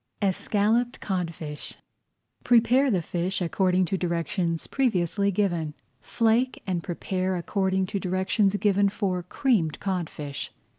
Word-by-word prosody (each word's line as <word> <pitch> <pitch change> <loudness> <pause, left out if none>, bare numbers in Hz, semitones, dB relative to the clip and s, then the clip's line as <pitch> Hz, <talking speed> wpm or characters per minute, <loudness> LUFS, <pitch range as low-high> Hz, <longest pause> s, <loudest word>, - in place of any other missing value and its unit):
ESCALLOPED 215 +5 +1
CODFISH 165 -6 -4 0.7
Prepare 245 +3 +4
the 185 -7 +1
fish 175 +3 -2
according 185 +1 +2
to 190 +2 -2
directions 170 -1 -1
previously 200 - +1
given. 175 -6 0 0.3
Flake 230 - +1
and 180 -3 -1
prepare 185 +2 -2
according 190 +1 0
to 195 +2 -3
directions 190 +2 +1
given 200 -1 +3
for 190 -3 -1
Creamed 180 - 0
Codfish. 165 -7 -4
190 Hz, 110 wpm, -26 LUFS, 175-210 Hz, 0.7 s, Prepare